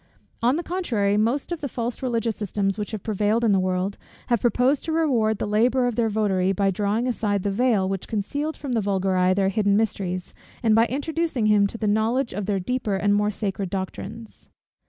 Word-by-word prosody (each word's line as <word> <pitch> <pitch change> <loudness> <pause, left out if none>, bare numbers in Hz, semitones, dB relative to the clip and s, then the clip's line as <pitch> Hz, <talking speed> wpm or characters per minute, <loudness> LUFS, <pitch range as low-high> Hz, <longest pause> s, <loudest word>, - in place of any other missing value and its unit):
On 245 +4 +3
the 340 - -2
contrary, 235 - 0
most 235 +10 0
of 345 - -3
the 285 - -2
false 240 +1 -4
religious 230 -3 -1
systems 195 -1 -1
which 210 - -3
have 215 -4 -6
prevailed 215 +2 +1
in 225 - +4
the 195 - +4
world, 185 +1 -1 0.3
have 235 -3 +2
proposed 250 +3 +2
to 325 - -2
reward 250 -10 +2
the - - -2
labour 240 +5 +2
of 245 -2 -1
their 225 -1 +1
votary, 195 -3 +1
by 195 0 +1
drawing 205 +5 0
aside 205 -5 -1
the 200 - 0
veil 215 -3 +2
which 195 -1 -3
concealed 285 +9 -3
from 280 - -5
the 230 -2 +1
vulgar 195 -1 0
eye 185 0 +3
their 195 -1 +2
hidden 200 0 +2
mysteries, 185 -4 -2 0.3
and 225 -2 +4
by 225 +2 +5
introducing 290 -1 -1
him 210 -1 +4
to 230 - -8
the 225 - -3
knowledge 225 +5 +1
of 200 +1 -4
their 200 -2 0
deeper 235 0 -1
and 205 +1 +2
more 210 0 +2
sacred 195 -2 -3
doctrines. 200 +3 -6
215 Hz, 210 wpm, -24 LUFS, 200-240 Hz, 0.3 s, by